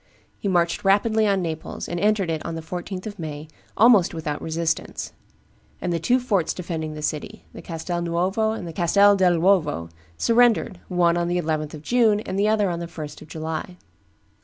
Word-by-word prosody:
He - - -3
marched 170 -3 +1
rapidly 215 +2 +3
on 195 -2 +1
Naples, 160 -2 -5
and 175 - -3
entered 205 -3 +2
it 160 -1 -3
on 165 - -4
the 165 - -6
14th 180 +2 -6
of 205 -3 -7
May, 155 -1 -6 0.3
almost 215 -7 +5
without 150 -2 -4
resistance; 165 0 -2 0.7
and 175 - -2
the 165 - 0
two 250 +10 +2
forts 200 -10 0
defending 160 -3 -4
the 150 - -7
city, 150 -1 -4
the - - -9
Castel 175 +1 -4
Nuovo 180 +6 0
and 220 -5 -4
the 165 - -7
Castel 200 +4 +4
dell' 180 -3 +3
Uovo 160 - +2 0.3
surrendered, 230 -4 +3
one 175 -2 +2
on 170 0 0
the 175 +1 0
11th 155 -2 -2
of 150 - -11
June 225 0 +3
and 190 -2 -4
the 205 - +3
other 215 -2 +2
on 170 - -3
the 170 - -5
1st 155 -3 -8
of - - -12
July. 160 +3 -5
175 Hz, 190 wpm, -23 LUFS, 160-200 Hz, 0.7 s, almost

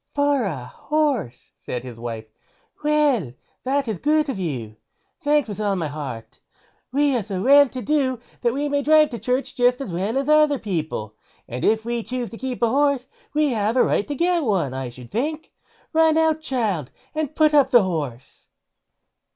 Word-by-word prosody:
"For 285 -4 +2
a 145 -10 -4
horse", 280 - -2
said 125 -1 -5
his 120 -3 -9
wife; 115 -2 -5 0.6
"well 290 - +2 0.3
that 270 0 0
is 215 -6 -3
good 305 0 +2
of 240 -8 -3
you; 120 - -4 0.4
thanks 295 -4 +2
with 210 -1 -6
all 205 -2 +1
my 165 -5 -2
heart. 140 -6 -7 0.5
We 285 0 +2
are 240 - +1
so 195 -2 -4
well 285 +3 +7
to 255 0 -6
do 275 -4 +1 0.2
that 235 - +2
we 285 +4 -1
may 285 0 0
drive 305 +1 +5
to 235 - -5
church, 255 +2 -1
just 245 0 +2
as 230 -11 -5
well 200 +8 -1
as 275 0 -1
other 305 -1 +4
people; 155 - -4 0.3
and 125 +2 -5
if 220 +1 +2
we 235 0 -1
choose 250 0 -4
to 230 - -8
keep 255 -1 -4
a 230 - +4
horse 280 -1 +2 0.3
we 300 -1 +3
have 220 0 0
a - - +6
right 205 - +1
to 290 - -3
get 345 +3 +2
one, 190 - 0
I 130 -1 -4
should 120 0 -12
think. 305 +7 -3 0.3
So - - -42
run 320 -1 +5
out, 320 -1 +2
child, 215 - -1 0.2
and 310 -1 -3
put 310 -1 +4
up 280 -3 +5
the 240 -5 +6
horse." 145 -9 -5
245 Hz, 190 wpm, -22 LUFS, 175-290 Hz, 0.6 s, well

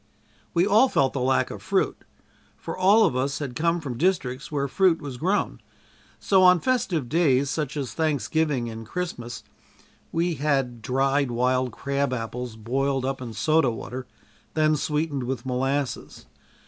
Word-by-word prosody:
We 170 +2 +4
all 215 +6 +5
felt 135 - +2
the 135 - -2
lack 130 +1 +1
of - - -8
fruit, - - -1 0.5
for - - -6
all 200 +4 +5
of - - 0
us 135 +2 0
had 135 -5 -5
come 170 +4 +1
from 130 -7 -6
districts 140 -8 0
where 140 -2 0
fruit 185 +2 +3
was 140 -4 -7
grown, 190 +9 -1 0.6
so 190 -2 +3
on 180 -1 +7
festive 185 - 0
days 140 -3 +2
such 150 -2 -3
as 135 -4 -3
Thanksgiving 150 -3 0
and 115 0 -7
Christmas, 125 -8 -5 0.7
we 170 +1 0
had 135 -5 -1
dried 135 +3 +1
wild 125 +1 +1
crab 140 -1 -1
apples 120 0 -4
boiled 135 +4 -1
up 135 0 -2
in 120 -3 -6
soda 155 +1 +2
water, 125 +2 -6 0.5
then 155 -1 +3
sweetened 150 -2 -1
with 125 -1 -4
molasses. 135 +2 -2
140 Hz, 155 wpm, -25 LUFS, 125-160 Hz, 0.7 s, on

